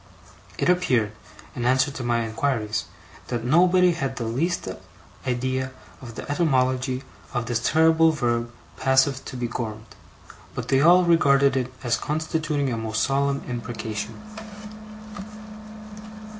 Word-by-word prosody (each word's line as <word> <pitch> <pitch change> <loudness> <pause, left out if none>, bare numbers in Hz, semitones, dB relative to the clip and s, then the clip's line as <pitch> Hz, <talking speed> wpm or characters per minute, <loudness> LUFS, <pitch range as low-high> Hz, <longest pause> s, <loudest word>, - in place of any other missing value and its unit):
It - - 0
appeared, 130 -13 +2 0.4
in 120 - -3
answer 130 +3 +3
to 135 -2 -6
my 120 -1 +1
inquiries, 110 -2 -1 0.4
that 120 -2 -3
nobody 180 +6 +5
had 135 -6 -3
the 120 - -4
least 150 - -1 0.6
idea 130 +1 -1 0.3
of 120 -3 -9
the - - -7
etymology 130 -4 +1 0.3
of 120 -2 0
this 120 0 0
terrible 160 +5 +4
verb 120 -5 -1 0.3
passive 130 0 +2
to 130 - -6
be 120 -1 -2
gormed; 110 -2 -5 0.7
but - - -5
that - - +3
they 135 - +4
all 175 +4 +7
regarded 140 -5 +4
it 130 -1 -1
as 120 -2 +1
constituting 155 -3 -1
a - - -2
most 110 -1 -1
solemn 140 0 +1
imprecation. 115 -3 -5
130 Hz, 130 wpm, -24 LUFS, 120-150 Hz, 0.7 s, all